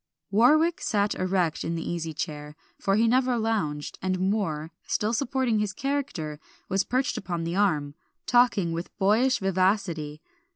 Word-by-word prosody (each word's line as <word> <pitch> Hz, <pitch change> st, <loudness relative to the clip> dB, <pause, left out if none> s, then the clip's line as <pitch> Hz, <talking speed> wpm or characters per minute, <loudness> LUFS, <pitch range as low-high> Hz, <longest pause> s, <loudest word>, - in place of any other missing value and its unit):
Warwick 310 Hz, -, +4 dB
sat 205 Hz, -1 st, +1 dB
erect 185 Hz, -3 st, 0 dB
in 165 Hz, -, -2 dB
the 165 Hz, -, -4 dB
easy 165 Hz, -2 st, -3 dB
chair, 150 Hz, -1 st, -5 dB, 0.2 s
for 195 Hz, -, +1 dB
he 225 Hz, +2 st, +3 dB
never 250 Hz, +1 st, +2 dB
lounged; 205 Hz, -11 st, -2 dB
and 185 Hz, -1 st, -1 dB
Moor, 185 Hz, -6 st, -1 dB, 0.2 s
still 215 Hz, +2 st, 0 dB
supporting 250 Hz, -2 st, 0 dB
his 210 Hz, -2 st, -1 dB
character, 255 Hz, -, -3 dB, 0.3 s
was 195 Hz, +1 st, +1 dB
perched 255 Hz, +5 st, -1 dB
upon 175 Hz, -3 st, -3 dB
the 170 Hz, +1 st, -3 dB
arm, 155 Hz, -8 st, +1 dB, 0.3 s
talking 240 Hz, -8 st, +3 dB
with 165 Hz, +2 st, -5 dB
boyish 220 Hz, +7 st, +3 dB
vivacity. 185 Hz, -5 st, 0 dB
195 Hz, 150 wpm, -26 LUFS, 165-230 Hz, 0.3 s, Warwick